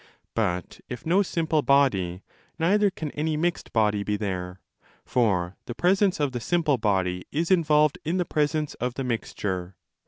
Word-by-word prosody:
But, 90 -6 -2
if 125 - -7
no 180 +5 +4
simple 160 -5 0
body, 100 -11 +2 0.3
neither 200 +5 +3
can 160 -6 -6
any 155 +1 -1
mixed 175 +2 -1
body 105 -3 +2
be 105 +1 -1
there: 95 -3 -4 0.5
for 95 -7 +1
the 120 - -5
presence 190 +2 +2
of 145 -2 +1
the 125 - -3
simple 155 -1 +1
body 95 -4 0
is 165 +5 -1
involved 150 -4 +3
in 170 +4 -1
the 180 - +1
presence 150 -1 0
of 125 0 -3
the 135 - -3
mixture. 95 -6 -3
135 Hz, 160 wpm, -26 LUFS, 100-160 Hz, 0.5 s, no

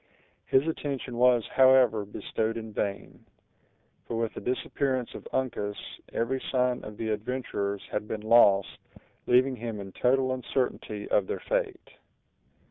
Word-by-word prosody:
His 135 +4 +3
attention 140 -5 -3
was, 125 -2 +4
however, 130 -5 +5
bestowed 110 +2 -3
in 110 -1 -7
vain; 100 -1 -4 0.8
for 115 - -3
with 115 -1 -1
the - - -7
disappearance 130 0 -1
of - - -9
Uncas, 105 -6 -2 0.3
every 130 +3 -1
sign 125 -1 +1
of 105 -1 -9
the 110 - -3
adventurers 105 -3 -3
had 105 - -2
been 110 -1 -4
lost, 105 -3 +4 0.5
leaving 130 +1 +4
him 115 -2 -5
in 95 -1 -7
total 130 +4 +2
uncertainty 125 -4 -3
of - - +2
their 430 - -3
fate. 455 -8 -2
120 Hz, 135 wpm, -28 LUFS, 110-130 Hz, 0.8 s, however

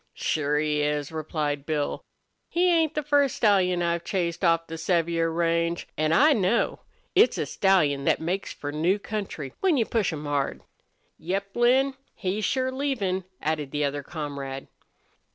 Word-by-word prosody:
"Sure 150 -1 0
he 150 0 +1
is," 150 0 -1
replied 155 -2 -2
Bill. 150 -1 -2 0.5
"He 355 +1 +3
ain't 320 -2 +2
the 300 - -1
first 285 -2 +2
stallion 185 -5 +3
I've 170 0 0
chased 175 -2 -2
off 165 -1 +3
the 165 - -7
Sevier 165 0 +1
range. 170 0 0
An' 155 0 +1
I 295 - +6
know. 210 -1 +1 0.3
It's 415 +5 +5
a - - -1
stallion 150 -8 +2
thet - - +3
makes 180 +4 -2
for 145 - -6
new 165 +6 +1
country, 200 -10 -5
when 370 -6 +2
you 230 - +2
push 215 -6 0
him 150 -2 -6
hard." 145 -2 -2 0.6
"Yep, 195 +3 -3
Lin, 260 +3 +3 0.2
he's 210 0 -2
sure 260 +4 0
leavin'," 230 -10 -1 0.2
added 150 -2 -1
the 145 +1 0
other 145 +1 -2
comrade. 140 -3 -6
170 Hz, 160 wpm, -26 LUFS, 150-215 Hz, 0.6 s, I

